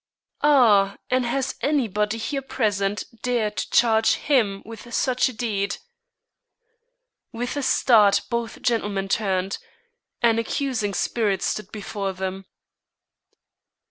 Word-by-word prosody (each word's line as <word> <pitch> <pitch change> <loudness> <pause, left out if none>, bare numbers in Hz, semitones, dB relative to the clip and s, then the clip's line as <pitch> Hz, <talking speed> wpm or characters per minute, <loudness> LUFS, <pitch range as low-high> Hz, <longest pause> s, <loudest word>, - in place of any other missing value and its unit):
"Ah, 220 -9 +4
and 255 -1 +2
has 265 +2 -1
anybody 220 -7 0
here 275 +5 -3
present 210 -7 -1 0.2
dared 230 -4 0
to - - -3
charge 225 -2 +4
him 220 -9 +1
with 230 +2 -10
such 255 +1 +1
a - - -8
deed!" 205 -4 -2 1.5
With 240 +3 -4
a 285 - -1
start 215 -6 +4
both 235 -1 -4
gentlemen 205 -5 0
turned; 195 -2 -1 0.6
an 230 -1 +4
accusing 230 -4 -2
spirit 205 -5 0
stood 210 -1 -3
before 200 -2 -4
them. 190 0 -5
220 Hz, 110 wpm, -23 LUFS, 200-245 Hz, 1.5 s, Ah